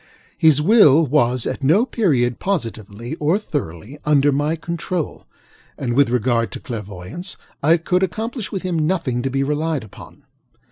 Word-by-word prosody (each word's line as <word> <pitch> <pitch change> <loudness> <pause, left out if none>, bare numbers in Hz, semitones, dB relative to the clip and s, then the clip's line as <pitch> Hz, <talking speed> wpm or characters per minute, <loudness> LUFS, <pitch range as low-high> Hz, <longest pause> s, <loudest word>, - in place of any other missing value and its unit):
His 155 -3 +4
will 165 - +6
was 125 -4 +2
at - - -4
no 175 - +4
period 135 - +1
positively, 115 - -3
or 155 +6 +2
thoroughly, 135 - -5
under 145 -1 +3
my 145 +3 0
control, 170 0 -4 0.5
and 125 -3 -2
in 135 -1 +3
regard 120 -1 +1
to - - -6
clairvoyance, 105 - -7 0.2
I 160 +4 +4
could 180 +2 0
accomplish 220 - -3
with 195 - -4
him 180 -3 -1
nothing 150 -9 -1
to 135 - -1
be 135 +1 0
relied 150 0 -1
upon. 110 - -14
150 Hz, 150 wpm, -20 LUFS, 125-170 Hz, 0.5 s, will